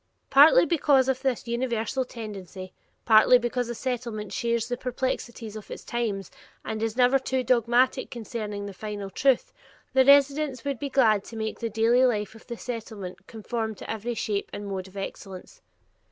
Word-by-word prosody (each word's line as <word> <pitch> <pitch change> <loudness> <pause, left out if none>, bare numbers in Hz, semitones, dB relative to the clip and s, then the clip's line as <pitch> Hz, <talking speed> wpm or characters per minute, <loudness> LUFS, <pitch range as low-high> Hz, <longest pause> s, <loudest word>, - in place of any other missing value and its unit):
Partly 290 +5 +7
because 290 -6 +3
of 265 -1 0
this 260 -3 -1
universal 235 +1 -1
tendency, 195 -6 -8 0.3
partly 225 +2 +7
because 245 0 -2
a 240 - -4
Settlement 235 -4 -4
shares 235 -1 -1
the 245 - -2
perplexities 245 -3 -4
of 215 - -9
its - - -8
times 210 -6 -3 0.3
and 220 0 -4
is 225 +1 -2
never 255 +2 +4
too 260 0 -1
dogmatic 245 +1 +2
concerning 215 -3 -5
the 200 - -7
final 205 0 -6
truth, 265 +4 +1 0.4
the 265 - +6
residents 280 -1 +4
would 280 -4 -2
be 285 - -3
glad 220 -7 +3
to 230 - -10
make 220 0 -4
the 230 - -2
daily 225 +4 +3
life 215 -4 0
at 225 - -16
the 235 -2 -6
Settlement 220 -7 -7
"conform 220 0 -4
to - - -10
every 225 +2 -3
shape 205 -2 -2
and 205 - -6
mode 190 -1 -4
of 190 +1 -13
excellence." 195 - -8
235 Hz, 170 wpm, -26 LUFS, 215-255 Hz, 0.4 s, Partly